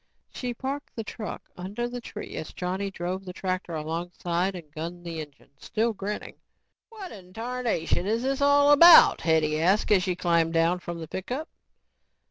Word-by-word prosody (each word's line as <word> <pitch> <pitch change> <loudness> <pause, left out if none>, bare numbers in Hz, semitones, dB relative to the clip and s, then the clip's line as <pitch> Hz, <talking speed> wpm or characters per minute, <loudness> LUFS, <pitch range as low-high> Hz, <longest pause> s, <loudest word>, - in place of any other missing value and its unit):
She 245 -1 -4
parked 275 +4 -5
the 225 - -3
truck 215 0 -7
under 205 +7 -4
the 245 0 -6
tree 210 -2 -8
as 155 - -6
Johnny 185 +2 -3
drove 185 0 -4
the 180 -1 -8
tractor 185 -2 -3
alongside 175 +3 -2
and 160 -4 -10
gunned 170 +3 -6
the 165 -2 -4
engine, 145 -2 -13
still 225 +1 -1
grinning. 205 +1 -5 0.5
"What 425 -5 -9
in 185 -3 -12
tarnation 230 -7 -1
is 225 +3 0
this 270 +1 -1
all 285 0 +5
about?" 335 +4 +9
Hetty 155 -1 +2
asked 195 +6 +2
as 200 -3 +5
she 180 -1 -1
climbed 170 -2 +1
down 165 +2 +2
from 175 -1 -6
the 160 - -7
pickup. 250 - -5
185 Hz, 170 wpm, -26 LUFS, 170-235 Hz, 0.5 s, about